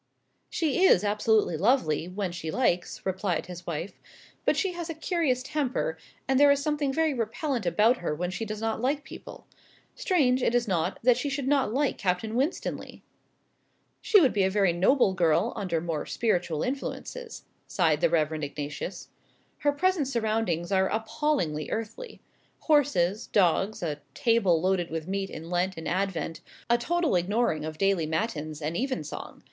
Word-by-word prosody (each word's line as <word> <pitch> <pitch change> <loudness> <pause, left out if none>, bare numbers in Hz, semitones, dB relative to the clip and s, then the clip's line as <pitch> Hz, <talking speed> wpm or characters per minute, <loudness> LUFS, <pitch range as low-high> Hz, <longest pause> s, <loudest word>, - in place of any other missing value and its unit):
"She 330 +2 0
is 210 - +6
absolutely 210 -3 +2
lovely, 170 - +2
when 185 0 -3
she 170 -2 -5
likes," 180 -4 0
replied 190 -3 -1
his 175 -1 -10
wife; 170 +3 -5 0.5
"but - - +3
she 385 - +1
has 345 -1 -6
a 330 - -4
curious 315 -6 0
temper; 295 - -1 0.3
and 265 0 +3
there 290 0 +7
is 280 0 +4
something 290 -1 0
very 315 +1 +1
repellent 240 - -2
about 220 +7 +4
her 170 -3 -2
when 180 +3 -3
she 205 - -4
does 215 -1 -5
not 225 0 -2
like 280 +3 0
people. - - -11 0.5
Strange, 265 -9 +2
is 240 0 +2
it - - -20
not, 180 -1 0
that 245 0 +5
she 285 +3 -2
should 275 -1 -3
not 275 -5 +2
like 275 +3 0
Captain 190 +3 -1
Winstanley?" 270 +8 -3 1.0
"She 420 - +5
would 275 -8 +4
be 205 - +1
a 190 - +3
very 195 -3 +2
noble 195 +4 +3
girl 175 +4 +2
under 180 -5 -1
more 160 -2 -3
spiritual 175 -8 0
influences," 450 - -5 0.2
sighed 160 -5 +1
the - - +4
Reverend 155 -1 0
Ignatius. 145 +4 -5 0.5
"Her 290 - +2
present 340 0 +1
surroundings 220 -8 -1
are 190 -1 +3
appallingly 220 - -1
earthly. 225 - -5 0.4
Horses, 240 - +2
dogs, 195 +1 +2
a 150 -3 -3
table 225 -8 +3
loaded 180 0 0
with 160 0 -4
meat 195 0 -2
in 165 +2 -8
Lent 180 +1 0
and 160 - -6
Advent, 180 -3 -2 0.3
a 235 - +5
total 340 - +1
ignoring 180 -3 +1
of 155 0 -5
daily 195 -4 +1
matins 155 -3 -3
and 155 +3 -2
even 260 - -1
song. 150 - -8
205 Hz, 165 wpm, -27 LUFS, 175-265 Hz, 1.0 s, there